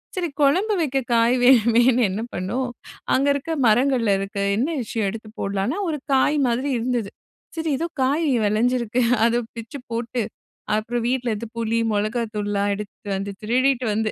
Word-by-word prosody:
சரி 355 -3 -1
குழம்பு 370 +10 +3
வைக்க 275 -3 0 0.2
காய் 230 +1 +4
வேணுமேன்னு 240 0 +5
என்ன 200 +4 -3
பண்ணோம். 235 +8 -2 0.4
அங்க 275 +2 +2
இருக்க 285 +4 -4 0.2
மரங்கள்ல 240 -1 +3
இருக்க 195 +1 -4 0.2
என்ன 260 +8 +1
விஷயம் 220 -2 -2
எடுத்து 220 +1 -8
போட்லான்னா, 195 - -1
ஒரு 300 -3 -2
காய் 285 +3 +3
மாதிரி 250 +4 0
இருந்தது. 235 -3 -1 0.5
சரி 325 -1 -2
ஏதோ 335 +4 -2 0.2
காய் 290 +5 +1 0.2
விளஞ்சிருக்கு 235 +2 +1 0.3
அத 235 0 +2 0.2
பிச்சு 230 +4 -7
போட்டு 235 +1 -2 0.5
அப்புறம் 230 +2 -2
வீட்டில் 250 -1 0
இருந்து 220 +2 -4
புளி, 230 0 0
மிளகாய் 215 +2 -1
தூள் 205 -1 -2
எல்லாம் 200 0 0
எடுத்துட்டு 205 +1 -8
வந்து 195 +1 -3
திருடிட்டு 255 +3 +1
வந்து 220 0 0
235 Hz, 155 wpm, -22 LUFS, 215-260 Hz, 0.5 s, வேணுமேன்னு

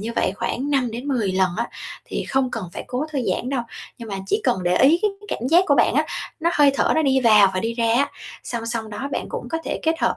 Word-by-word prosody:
như 225 +3 -4
vậy - - +1
khoảng 270 +7 -2
5 265 -4 +1
đến 240 +5 -6
10 230 -8 0
lần 185 -1 +2
á, 235 +2 -1 0.4
thì - - -4
không 265 -1 +1
cần 230 -5 -4
phải - - -6
cố 250 +4 -2
thư 285 - -1
giãn 250 - -3
đâu, 265 -3 -1 0.4
nhưng 230 -2 -8
mà 195 -2 -4
chỉ - - +1
cần 185 - +1
để 175 0 +1
ý 290 - +5
cái 425 - +3
cái 415 - -14
cảm 240 - -2
giác 345 +5 +5
của 285 - +4
bạn 240 -2 +3
á, 305 +3 +2 0.3
nó 335 +1 +2
hơi 290 -1 +6
thở - - +2
nó 315 - +2
đi 265 -2 +3
vào 215 -5 +6
và 185 - 0
đi 230 +3 -2
ra 230 -1 +1
á. 275 +4 +2 0.3
Song 230 -2 -4
song 230 -2 -3
đó 265 +7 -5
bạn - - -2
cũng - - -5
có 325 - -1
thể - - -3
kết 325 0 +1
hợp - - +1
245 Hz, 285 wpm, -22 LUFS, 225-280 Hz, 0.4 s, hơi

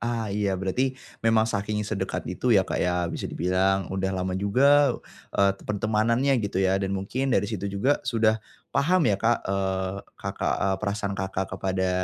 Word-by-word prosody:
Ah, 115 -3 -2
iya 100 -2 0
berarti 125 +8 -1 0.2
memang 115 -1 +3
saking 105 -1 -2
sedekat 100 -2 -3
itu 90 +7 -3
ya 100 -5 +5
Kak, - - -2
ya 90 0 +1
bisa - - -4
dibilang 95 +2 +1
udah 95 0 -1
lama 95 0 -2
juga, 130 +8 +4 0.3
eee, 100 0 +3
pertemanannya 115 +5 +1
gitu 100 -3 -3
ya 95 0 +2
dan 95 - -1
mungkin 125 +8 -2
dari 115 - +2
situ 100 -2 -3
juga 120 +9 +1
sudah, 110 -3 +1 0.3
paham 175 +4 +3
ya 100 -4 +2
Kak, 115 +1 +1
eee, 95 0 -1 0.2
Kakak, - - -2
eee, 95 -1 0
perasaan 100 -1 -2
Kakak 95 0 -3
kepada 95 -1 -1
100 Hz, 170 wpm, -26 LUFS, 95-115 Hz, 0.3 s, ya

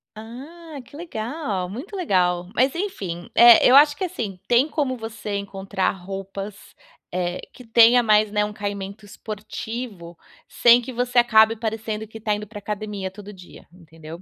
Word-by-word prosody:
Ah, 280 +7 -10
que - - -16
legal, 230 - -4
muito 265 - -8
legal, 180 - 0
mas, 260 +3 +2
enfim. 190 - -5
Eh, 235 -1 +8
eu 255 - +6
acho 290 0 +6
que 375 - -5
assim, 215 - -4
tem 245 +4 +3
como 285 -5 -2
você 220 -2 -5
encontrar 195 -1 -2
roupas, 195 +2 -8 0.4
eh, 180 0 -2
que 250 - -13
tenha 235 +2 +6
mais, 215 -1 +4
né, 210 0 0
um 210 - -3
caimento 200 0 -6
esportivo, 210 -3 -7 0.3
sem 240 0 +5
que 260 - -7
você 245 0 -2
acabe 220 -2 +5
parecendo 220 -1 -4
que 220 +1 -11
tá 215 -1 -1
indo 210 0 -6
pra 210 0 -10
academia 205 -2 -5
todo 205 +1 -11
dia, 185 -3 -15
entendeu. 165 -1 -12
215 Hz, 160 wpm, -22 LUFS, 195-240 Hz, 0.4 s, Eh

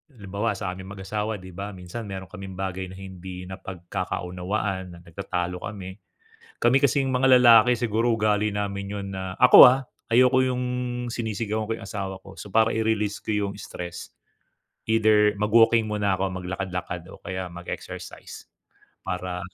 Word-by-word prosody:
halimbawa 100 +1 -2
sa 90 - -3
aming 95 +1 -8
mag-asawa, 105 +3 -3
'di 95 0 -10
ba, 100 +3 -6
minsan 95 +5 -7
meron 95 -1 -7
kaming 95 0 -8
bagay 95 0 -4
na 95 - -10
hindi 95 -1 -8
napagkakaunawaan, 95 +1 -4
na - - -13
nagtatalo 90 0 -4
kami. 95 -1 -8 0.6
Kami 120 +3 +4
kasing 140 0 +3
mga 130 0 +6
lalaki 120 0 +7
siguro 115 0 +1
ugali 105 -1 +1
namin 100 -1 -3
'yon 100 -1 -4
na 95 0 -5
ako, 125 0 +8
ah, 130 +1 -1 0.2
ayoko 130 +2 +5
'yong 125 -1 0 0.5
sinisigawan 110 -1 -2
ko 115 - -1
'yong - - -9
asawa 95 -2 -4
ko. 95 0 -13
So 105 - -9
para 110 +3 +3
i-release 110 -2 0
ko - - -5
'yong 100 -1 -1
stress, 90 -2 -7 0.8
either 105 -2 +4
mag-walking 115 +1 +4
muna 105 -2 0
ako, 95 0 -1
maglakad 95 +1 -4
lakad 90 -1 -4
o - - -11
kaya 95 -1 -4
mag-exercise 85 0 -8 0.6
para 90 0 -3
100 Hz, 155 wpm, -25 LUFS, 95-110 Hz, 0.8 s, ako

